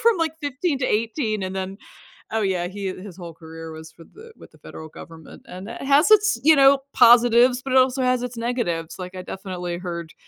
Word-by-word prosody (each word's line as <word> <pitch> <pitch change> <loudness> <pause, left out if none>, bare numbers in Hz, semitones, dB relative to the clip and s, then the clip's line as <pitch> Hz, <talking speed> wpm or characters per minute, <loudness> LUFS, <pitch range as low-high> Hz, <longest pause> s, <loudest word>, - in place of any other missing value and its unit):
from 460 -3 +4
like 320 -1 0
15 285 +1 -2
to 255 - -1
18. 220 -1 -1
And 190 +1 -4
then 190 +1 -5 0.6
Oh, 225 - +1
yeah. 185 -3 -1
He, 195 +1 -5
uh 185 - -4
his 190 -1 -11
whole 170 -2 -9
career 160 0 -10
was 160 0 -11
with 165 - -17
the 445 +2 -14
with - - -16
the - - -21
federal 160 - -11
government. 160 0 -13
And 185 +3 -9
it - - -8
has 285 +8 +3
its, 430 0 +4
you 315 +1 +6
know, 275 0 +6 0.2
positives, 245 +1 +5
but 265 -1 -3
it 260 - +7
also 260 +1 +2
has 250 -1 +1
its 245 -1 -6
negatives. 230 -9 -3
Like, 185 0 -8
I 185 - -6
definitely 180 -2 -6
heard 170 -2 -7
215 Hz, 220 wpm, -22 LUFS, 180-265 Hz, 0.6 s, it